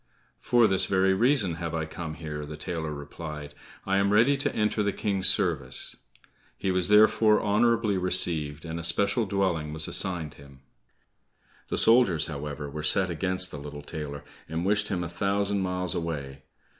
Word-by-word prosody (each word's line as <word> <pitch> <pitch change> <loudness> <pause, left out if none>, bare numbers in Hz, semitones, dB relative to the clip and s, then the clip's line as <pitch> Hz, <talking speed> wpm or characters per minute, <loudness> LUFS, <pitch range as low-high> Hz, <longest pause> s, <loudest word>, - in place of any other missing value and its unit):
"For 120 -1 +3
this 95 -3 +3
very 95 0 +2
reason 105 - +2
have 85 -1 -3
I 80 -1 -2
come 80 0 -7
here," 75 -1 -6
the 75 +1 -8
tailor 80 -1 -4
replied, 75 0 -8 0.3
"I 95 0 +1
am 100 0 +2
ready 115 +7 +4
to 145 +1 -2
enter 105 0 0
the 100 -1 +1
King's 100 -2 0
service." 70 -8 -1 0.6
He 95 - -1
was 90 -1 +2
therefore 105 +1 +5
honorably 110 -1 +2
received 85 -4 0
and 80 0 -5
a - - -6
special 100 +6 +1
dwelling 90 -6 -1
was 80 0 -1
assigned 85 -6 -2
him. 70 -2 -16 1.1
The - - -2
soldiers, 115 -10 +4
however, 75 -1 -6
were 75 +2 -6
set 95 +4 +3
against 95 +2 0
the 75 - -7
little 75 0 -8
tailor, 75 -2 -6 0.3
and 80 +3 -3
wished 105 +1 +2
him 90 -3 -2
a - - -3
thousand 100 +3 -1
miles 90 -2 -2
away. 70 -5 -5
90 Hz, 170 wpm, -27 LUFS, 75-100 Hz, 1.1 s, therefore